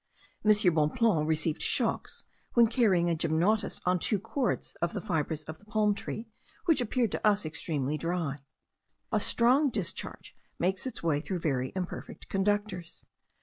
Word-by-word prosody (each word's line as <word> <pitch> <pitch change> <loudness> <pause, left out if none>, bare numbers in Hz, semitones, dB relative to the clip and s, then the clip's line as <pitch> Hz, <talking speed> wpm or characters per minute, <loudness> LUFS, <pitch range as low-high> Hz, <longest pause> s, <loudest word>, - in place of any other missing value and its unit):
M. 215 - +2 0.2
Bonpland 155 +2 +2
received 155 0 0
shocks, - - -1 0.3
when 235 -1 +7
carrying 215 -7 +3
a 170 - +2
gymnotus 165 +7 +1
on 180 0 +2
two 210 - +1
cords 230 +6 -2
of 170 0 0
the - - -2
fibres 160 -3 -2
of 160 +1 -8
the 205 - -21
palm 215 -1 +2
tree, 220 +3 -6 0.4
which 325 -6 +4
appeared 240 -2 0
to - - -3
us 205 -4 +3
extremely 150 -2 -2
dry. 165 -4 -2 0.7
A - - +3
strong 260 +5 +4
discharge 205 -8 -4 0.2
makes 185 +7 0
its 255 - -5
way 155 -4 +2
through 185 +3 -3
very 130 -5 0
imperfect 180 -2 -6
conductors. 195 -3 -1
180 Hz, 150 wpm, -30 LUFS, 160-215 Hz, 0.7 s, when